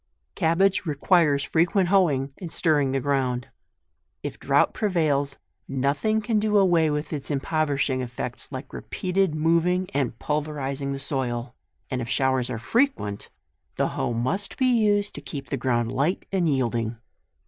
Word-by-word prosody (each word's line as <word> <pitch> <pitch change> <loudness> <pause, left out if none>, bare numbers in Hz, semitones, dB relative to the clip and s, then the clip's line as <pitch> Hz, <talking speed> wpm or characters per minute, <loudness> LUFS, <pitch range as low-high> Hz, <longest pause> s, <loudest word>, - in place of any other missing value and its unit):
CABBAGE 185 - +2
requires 150 -1 +3
frequent 175 +3 +2
hoeing 145 -9 +2
and 175 -4 -6
stirring 150 -6 +2
the 135 - +1
ground. 130 -3 -1 0.7
If - - -5
drought - - +3
prevails, 150 -8 0 0.3
nothing 140 +11 0
can 220 0 +1
do 210 0 +2
away 175 -5 +4
its 150 -1 -3
impoverishing 145 -2 0
effects 125 +1 -5
like 130 0 -7
repeated 185 -3 -1
moving 170 +4 +2
and 135 -5 -1
pulverizing 145 -2 -2
the 140 - -2
soil, 125 -3 -3 0.4
and 130 -1 -1
if 115 - -5
show 130 +2 +2
ers 125 -2 -1
are 125 - -3
frequent, 120 - 0 0.5
the - - +1
hoe - - -2
must 130 - -1
be 260 - +2
used 205 -2 +2
to - - -7
keep 135 -4 -7
the - - +1
ground 120 -2 0
light 140 +8 0
and 180 -4 +1
yielding. 120 -4 0
145 Hz, 150 wpm, -25 LUFS, 130-180 Hz, 0.7 s, away